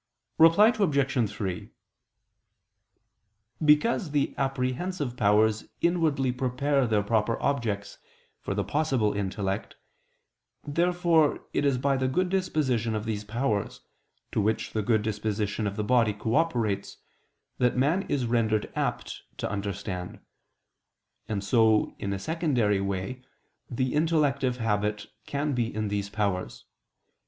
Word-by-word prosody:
Reply 165 +7 +7
Obj. 140 - +1
3: 95 -4 -4 1.9
Because 155 +5 +3
the 145 -1 0
apprehensive 135 +2 -2
powers 110 -1 +3
inwardly 160 -7 +1
prepare 130 +2 0
their 105 -2 +1
proper 110 +1 0
objects 110 -8 -2 0.4
for - - -4
the - - 0
possible 135 -8 0
intellect, 100 +1 -3 0.9
therefore 170 0 +2
it - - +1
is 140 -2 +2
by 135 +1 +1
the 130 0 0
good 180 +8 0
disposition 135 - 0
of 105 0 -3
these 105 -2 -3
powers, 110 -1 -2 0.5
to - - +1
which 110 +2 -1
the 110 - 0
good 110 0 +1
disposition 105 0 -2
of 100 - -3
the 105 - -2
body 115 -1 +3
cooperates, 115 -2 -1 0.6
that 125 0 +2
man 150 +9 +2
is 135 -4 0
rendered 110 -2 0
apt - - -3 0.2
to - - -2
understand. 100 -2 -4 1.1
And 100 -2 -2
so 110 0 +3
in 100 - -3
a 100 - -1
secondary 125 - 0
way 100 +6 -3 0.5
the 130 +1 -1
intellective 145 -5 +1
habit 105 -2 -1 0.2
can 145 +1 -1
be 120 -2 0
in 110 -1 -2
these 100 0 -2
powers. 100 -3 -2
120 Hz, 125 wpm, -27 LUFS, 105-140 Hz, 1.9 s, Reply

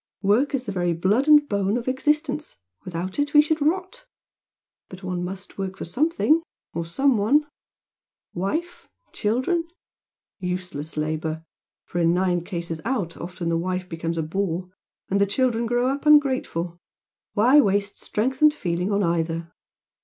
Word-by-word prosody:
Work 235 +9 +3
is 255 -1 -3
the 205 - -3
very 175 -3 0
blood 200 - +1
and 295 -1 +7
bone 200 0 0
of 240 - -5
existence 300 +3 0 0.3
without 180 +5 -4
it 290 +1 0
we 295 - +10
should 310 0 -1
rot! 375 +11 -1 0.8
But 185 +1 -11
one 180 -1 -3
must 190 +2 -7
work 190 -1 -3
for - - -5
something 315 - +2 0.3
or 170 0 -3
some 265 +9 +2
one 280 +9 +3 0.9
wife? 315 - -3 0.3
children? 260 +11 0 0.7
Useless 180 -5 -4
labour! 155 +1 -2 0.4
for 175 - -4
in 170 0 +3
nine 180 -2 +1
cases 170 -3 -5
out 210 -10 -2
often 175 0 -5
the 165 0 +1
wife 185 +1 -2
becomes 165 -1 -3
a 160 - 0
bore, 180 +1 -2 0.4
and 200 +1 +1
the 200 - +4
children 235 +1 +1
grow 245 +2 +1
up 280 +3 -2
ungrateful. 255 - +3 0.5
Why 255 +8 +6
waste 200 -2 0
strength 260 +6 -1
and 305 0 +8
feeling 180 - -2
on 200 0 +2
either?" 165 -1 -1
200 Hz, 155 wpm, -24 LUFS, 175-275 Hz, 0.9 s, we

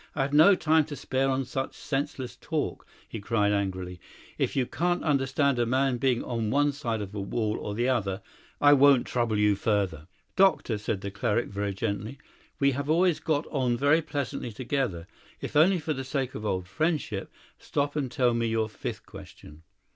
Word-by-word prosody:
"I - - +1
have 140 +1 -3
no 160 +7 +7
time 160 -2 +3
to 150 -1 -7
spare 135 +1 -1
on 135 0 0
such 135 +2 -4
senseless 135 -2 -3
talk," - - -3 0.2
he 110 - -6
cried 105 -1 +1
angrily. 95 -3 -2 0.4
"If - - 0
you 130 - +2
can't 175 +6 -1
understand 140 -2 +1
a 120 - +3
man 130 +1 +1
being 125 -1 +1
on 115 -3 -2
one 145 +4 +3
side 115 -7 -3
of 100 0 -9
a 105 - -4
wall 105 +2 -1
or 105 - -5
the 120 +3 0
other, 100 -6 -1 0.4
I 145 0 +7
won't 140 -2 +6
trouble 120 -3 0
you 105 -1 +3
further." 95 -7 -1 0.3
"Doctor," 155 - +3
said 105 -1 -3
the 100 - -5
cleric 115 +2 -1
very 100 0 -3
gently, 105 +6 -3 0.4
"we 140 -1 +4
have 140 +2 -3
always 175 +1 +3
got 155 -1 0
on 125 -5 +1
very 145 +5 +4
pleasantly 140 -6 -4
together. 120 -7 -2 0.3
If - - -6
only 175 +6 +5
for 155 -1 -2
the 135 -1 -4
sake 130 -1 -2
of 105 - -4
old 90 -2 -2
friendship, 150 - -2 0.3
stop 145 0 -2
and 135 -5 -2
tell 125 -2 +2
me 115 0 0
your 110 -1 0
fifth 110 - -6
question." 75 +2 -13
125 Hz, 190 wpm, -27 LUFS, 105-145 Hz, 0.4 s, no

